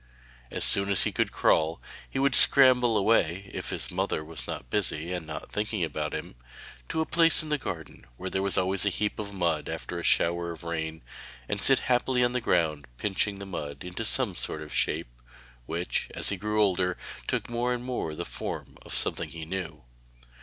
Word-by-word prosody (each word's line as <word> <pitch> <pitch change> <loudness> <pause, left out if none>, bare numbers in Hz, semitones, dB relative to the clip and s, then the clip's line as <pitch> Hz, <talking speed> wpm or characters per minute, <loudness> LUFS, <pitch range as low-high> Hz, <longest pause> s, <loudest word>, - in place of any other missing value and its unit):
As - - +1
soon 100 0 +6
as 100 - +6
he - - +1
could - - 0
crawl, 80 +1 +2 0.3
he - - -5
would 140 0 +2
scramble 125 -5 +6
away 95 -3 +1
(if - - -4
his - - -3
mother 75 - -1
was 80 +1 -7 0.2
busy 90 -4 0
and 90 -3 -5
not 75 - -7
thinking 105 -2 -1
about 80 -3 -3
him) - - -6 0.6
to 160 - 0
a - - 0
place 165 -1 +4
in 155 - -7
the 150 -1 0
garden 80 - -7
where 95 0 -5
there 95 - 0
was 100 0 -1
always 95 0 +1
a 100 - +3
heap 105 +3 -1
of 100 -1 -4
mud 85 -6 -1
after 80 +2 -5
a - - -6
shower 85 0 +2
of 85 0 -8
rain, 80 -3 -4 0.4
and 100 -1 -2
sit 135 - +5
happily 125 0 +2
on 120 0 +1
the 125 - 0
ground 80 - +1
pinching 100 - 0
the 100 - -7
mud 75 -7 -6
into 90 0 -5
some - - +3
sort 75 - -2
of 75 - -10
shape, - - -1 0.5
which 85 +2 -2
as - - +1
he 100 - 0
grew 105 +3 +1
older, 90 -2 +1 0.3
took - - -1
more 120 +1 -1
and 125 -1 -2
more 125 -11 -3
the - - -4
form - - -6
of - - -5
something - - 0
he 80 -1 -7
knew. 95 -3 -5
95 Hz, 200 wpm, -28 LUFS, 80-110 Hz, 0.6 s, soon